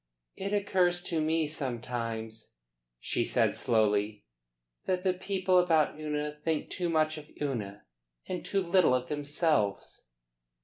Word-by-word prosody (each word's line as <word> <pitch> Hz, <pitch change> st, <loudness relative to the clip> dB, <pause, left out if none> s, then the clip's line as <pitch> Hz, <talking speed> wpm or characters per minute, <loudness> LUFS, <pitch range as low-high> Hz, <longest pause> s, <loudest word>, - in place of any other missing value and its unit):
"It 195 Hz, +1 st, -4 dB
occurs 185 Hz, -4 st, +2 dB
to 165 Hz, -2 st, -1 dB
me 160 Hz, +1 st, +1 dB
sometimes," 115 Hz, -, -4 dB, 0.4 s
she -, -, 0 dB
said -, -, +2 dB
slowly, 105 Hz, -2 st, +1 dB, 0.6 s
"that 185 Hz, -1 st, 0 dB
the 185 Hz, -1 st, +2 dB
people 185 Hz, 0 st, +1 dB
about 160 Hz, -4 st, +2 dB
Una 150 Hz, -1 st, -2 dB
think 160 Hz, -2 st, -1 dB
too 175 Hz, -1 st, -1 dB
much 155 Hz, -1 st, +1 dB
of 150 Hz, 0 st, -14 dB
Una 110 Hz, -8 st, -3 dB, 0.4 s
and 180 Hz, -, -4 dB
too 195 Hz, -1 st, 0 dB
little 175 Hz, -6 st, +4 dB
of 125 Hz, 0 st, -2 dB
themselves." 145 Hz, -, 0 dB
155 Hz, 130 wpm, -30 LUFS, 120-180 Hz, 0.6 s, little